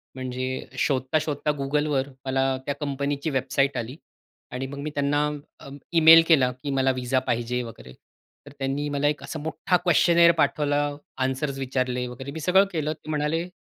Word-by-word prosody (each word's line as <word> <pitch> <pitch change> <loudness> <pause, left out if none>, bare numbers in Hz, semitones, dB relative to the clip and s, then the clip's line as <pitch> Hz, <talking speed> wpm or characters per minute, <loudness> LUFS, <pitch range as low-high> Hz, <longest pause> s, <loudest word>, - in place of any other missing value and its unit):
म्हणजे 130 0 -4
शोधता-शोधता 145 +3 0
Googleवर 140 -1 0 0.2
मला 135 0 0 0.2
त्या 145 - -1
कंपनीची 140 +1 -2
वेबसाईट 135 0 0
आली 120 +3 -4 0.6
आणि 130 +1 -4
मग 140 +1 -8
मी 150 +2 -4
त्यांना 145 +1 +1 0.3
अ, - - -11 0.2
ई-मेल 165 0 +8
केला 135 -6 +4
की 145 - -3
मला 135 0 +2
व्हिसा 130 0 0
पाहिजे 120 +1 -1
वगैरे, 105 - -11 0.5
तर 145 - -12
त्यांनी 135 +2 -2
मला 145 0 0
एक 145 -1 -1
असा 155 +2 -6
मोठ्ठा 160 +4 0
क्वेश्‍चनेअर 170 0 +5
पाठवला, 145 -1 +1 0.4
अन्सर्स 135 +1 -2
विचारले 125 -1 -1
वगैरे. 130 +3 -8
मी 160 - -6
सगळं 190 +5 +4
केलं 155 -2 -1
ते 155 0 -14
म्हणाले, 155 +3 -1
140 Hz, 160 wpm, -25 LUFS, 130-150 Hz, 0.6 s, ई-मेल